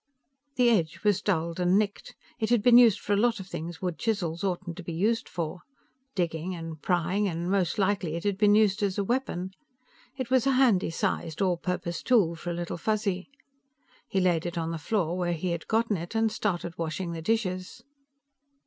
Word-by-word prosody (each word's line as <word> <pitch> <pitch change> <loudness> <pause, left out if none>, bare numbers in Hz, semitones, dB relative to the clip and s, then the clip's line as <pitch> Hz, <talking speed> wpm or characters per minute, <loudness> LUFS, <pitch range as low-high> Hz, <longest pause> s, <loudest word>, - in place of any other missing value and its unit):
The 245 -2 +4
edge 170 -8 0
was 205 -3 +3
dulled 170 -3 -1
and 180 +2 +3
nicked; 205 -1 -2 0.2
it 220 - 0
had 240 -4 +3
been 245 0 +8
used 225 -5 +6
for 205 - -1
a - - +3
lot 230 +1 +2
of 190 - -7
things 170 -1 -7
wood 180 -3 -2
chisels 180 -7 -1
oughtn't 180 -2 -2
to 185 - -7
be 170 - -5
used 215 +7 0
for. 170 +1 -4 0.6
Digging, 175 0 -2
and 165 -2 -7
prying, 185 +3 +1
and 170 0 -2
most 190 -4 +1
likely, 190 -5 0
it 170 - -4
had 205 -1 +1
been 205 +1 +4
used 210 -1 +3
as 200 -2 0
a 200 - +1
weapon. 195 -6 -2 0.7
It 255 -2 -4
was 260 0 +3
a 270 - +4
handy 245 -10 +3
sized, 165 -1 -2
all 185 -3 +2
purpose 170 0 -3
tool 210 -10 +3
for 170 +1 -6
a - - -1
Little 175 0 -4
Fuzzy. 205 -1 -1 0.8
He 195 - 0
laid 175 -2 +2
it 175 0 -5
on 165 0 -2
the 165 - -4
floor 175 0 0
where 175 -1 0
he 170 +2 -2
had 170 -1 -4
gotten 225 -2 +1
it 170 +6 -7
and 225 0 +2
started 175 -6 -2
washing 170 +2 -3
the 165 -1 -5
dishes. 190 +2 -2
185 Hz, 200 wpm, -28 LUFS, 170-215 Hz, 0.8 s, been